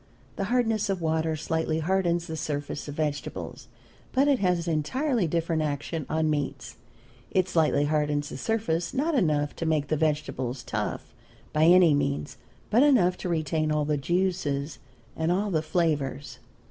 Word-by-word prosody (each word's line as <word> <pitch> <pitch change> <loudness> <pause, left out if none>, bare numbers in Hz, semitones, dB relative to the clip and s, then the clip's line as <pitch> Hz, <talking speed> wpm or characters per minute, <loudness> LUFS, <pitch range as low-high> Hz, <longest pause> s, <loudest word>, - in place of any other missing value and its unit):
The 195 - -2
hardness 225 -2 +1
of 195 -2 0
water 160 -1 0
slightly 160 +1 -1
hardens 170 0 +1
the 160 -2 -5
surface 145 -2 -4
of 145 - -6
vegetables, 150 -2 -4 0.5
but 270 +2 +3
it 280 -3 +3
has 180 -3 +1
an 165 - +1
entirely 235 - 0
different 165 0 0
action 150 +1 -3
on 160 0 +1
meats. 140 -3 -3 0.5
It 185 -1 +1
slightly 155 -4 +2
hardens 150 -1 0
the - - -6
surface 175 -5 -1
not 310 +5 +1
enough 150 - +1
to 165 - -3
make 150 -3 0
the 155 - +1
vegetable 145 -5 -1
tough, 120 - -4 0.4
by 155 +1 +4
any 175 -2 +7
means, 140 -1 -1 0.3
but 230 +4 +5
enough 235 -12 +4
to 180 - -4
retain 155 -1 0
all 150 -1 +1
the 150 0 +1
juices 155 -2 -1 0.4
and 160 +1 0
all 200 +3 0
the 160 -3 +1
flavors. 145 -6 -1
160 Hz, 160 wpm, -27 LUFS, 150-180 Hz, 0.5 s, any